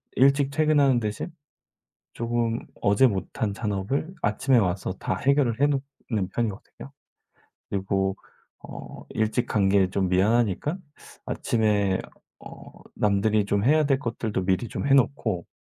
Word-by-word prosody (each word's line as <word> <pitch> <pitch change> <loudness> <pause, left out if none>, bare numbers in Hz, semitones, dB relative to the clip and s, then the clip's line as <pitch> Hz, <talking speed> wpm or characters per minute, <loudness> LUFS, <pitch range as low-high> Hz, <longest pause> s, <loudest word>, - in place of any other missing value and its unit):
일찍 140 +1 +4
퇴근하는 145 -4 +3
대신 110 - -4 0.8
조금 115 0 -1 0.2
어제 100 +6 +4
못한 100 +1 -2
잔업을 105 - -2
아침에 120 +5 +2
와서 95 -2 0
다 - - -2
해결을 140 -3 +1
해 145 - +5
놓는 135 -8 -3
편이거든요. 115 +5 -5 0.8
그리고 95 -1 -1 0.5
어 - - -10
일찍 110 +3 0
간 100 -2 +1
게 95 -2 +3
좀 95 -1 0
미안하니까 110 - +2 0.5
아침에 105 -4 +1 0.4
어 - - -12 0.2
남들이 105 +1 +2
좀 100 0 0
해야 155 +4 +4
될 135 -2 +2
것들도 115 -6 -3
미리 95 +5 0
좀 - - -4
해 140 - +3
놓고 130 -9 +1
110 Hz, 260 characters per minute, -25 LUFS, 100-135 Hz, 0.8 s, 해